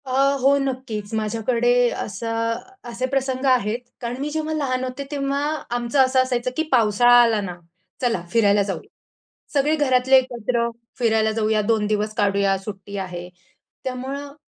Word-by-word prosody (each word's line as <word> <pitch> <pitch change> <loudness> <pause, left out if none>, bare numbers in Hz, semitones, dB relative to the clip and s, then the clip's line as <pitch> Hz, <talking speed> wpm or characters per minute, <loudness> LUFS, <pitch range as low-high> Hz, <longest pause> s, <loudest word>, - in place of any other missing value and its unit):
अ, 260 - -6 0.3
हो 275 +2 +5
नक्कीच, 255 -6 -4
माझ्याकडे 230 +3 +1 0.3
असं 230 +2 -2 0.3
असे 235 +2 -2
प्रसंग 265 0 -1
आहेत. 240 -3 +2 0.2
कारण 240 0 -3
मी 295 - -2
जेव्हा 315 +1 -2
लहान 260 -4 -1
होते, 255 +2 -4
तेव्हा 280 -1 -1 0.3
आमचं 240 +3 -1
असं 260 0 +3
असायचं 255 -1 -1
की 320 - +2
पावसाळा 235 -1 +4
आला 225 -3 +3
ना, 180 -3 -5 0.5
चला 235 -8 0
फिरायला 205 -3 +4
जाऊया. 195 -1 -5 0.6
सगळे 295 +2 +2
घरातले 260 -3 +3
एकत्र 240 -2 0 0.3
फिरायला 220 -2 +2
जाऊया 215 -1 +1
2 215 0 +1
दिवस 210 0 -1
काढूया 200 -2 +2
सुट्टी 195 0 -8
आहे. 180 -2 -5 0.5
त्यामुळं 270 +2 -5
240 Hz, 145 wpm, -22 LUFS, 215-260 Hz, 0.6 s, हो